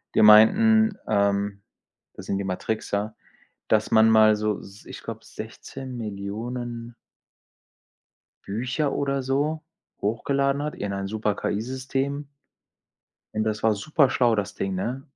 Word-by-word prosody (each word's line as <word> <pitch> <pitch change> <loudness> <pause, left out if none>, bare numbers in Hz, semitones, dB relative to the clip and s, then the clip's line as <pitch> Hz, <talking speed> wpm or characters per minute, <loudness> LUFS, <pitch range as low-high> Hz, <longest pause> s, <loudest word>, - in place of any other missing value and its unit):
Die - - +5
meinten, 215 - +6
ähm 100 -1 +1 0.5
das - - -10
sind 100 - -1
die 100 - -3
Matrixer, 105 +2 -2 0.6
dass 110 -1 +2
man 110 0 +6
mal 110 -1 +6
so 105 -1 -1
s 100 +1 -13
ich - - -9
glaube - - -7
16.000.000 120 0 -6 1.5
Bücher 125 +8 -1
oder 140 -1 -1
so 145 +4 -1 0.4
hochgeladen 140 +6 0
hat 150 - -4
in 100 0 -4
ein 100 0 -3
super 105 0 -1
KI-System. 130 +7 -3 1.1
Und 110 - +1
das 105 -1 -2
war 110 -1 +4
super 140 +6 +2
schlau, 120 -3 +3
das 100 -1 -2
Ding, 95 -1 -3
ne? 120 +8 -3
110 Hz, 125 wpm, -25 LUFS, 105-135 Hz, 1.5 s, meinten